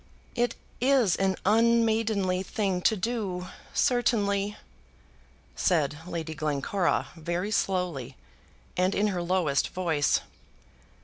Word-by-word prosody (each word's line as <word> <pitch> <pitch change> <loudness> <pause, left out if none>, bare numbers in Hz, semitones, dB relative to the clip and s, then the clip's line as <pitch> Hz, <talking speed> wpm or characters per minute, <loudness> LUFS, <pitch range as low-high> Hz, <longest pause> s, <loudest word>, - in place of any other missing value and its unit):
"It 240 0 0 0.3
is 255 -8 +4
an 190 -1 +1
unmaidenly 220 -3 +3
thing 195 -1 -1
to 220 +3 +3
do, 190 -4 -3 0.2
certainly," 210 -5 +1 1.0
said 150 -5 +1
Lady 165 -2 -4
Glencora 155 +4 0
very 175 +5 -3
slowly, 175 - -1 0.6
and 185 +2 +1
in 210 +1 +2
her 180 -3 -2
lowest 170 -6 +1
voice. 165 -6 +1
190 Hz, 100 wpm, -28 LUFS, 170-215 Hz, 1.0 s, is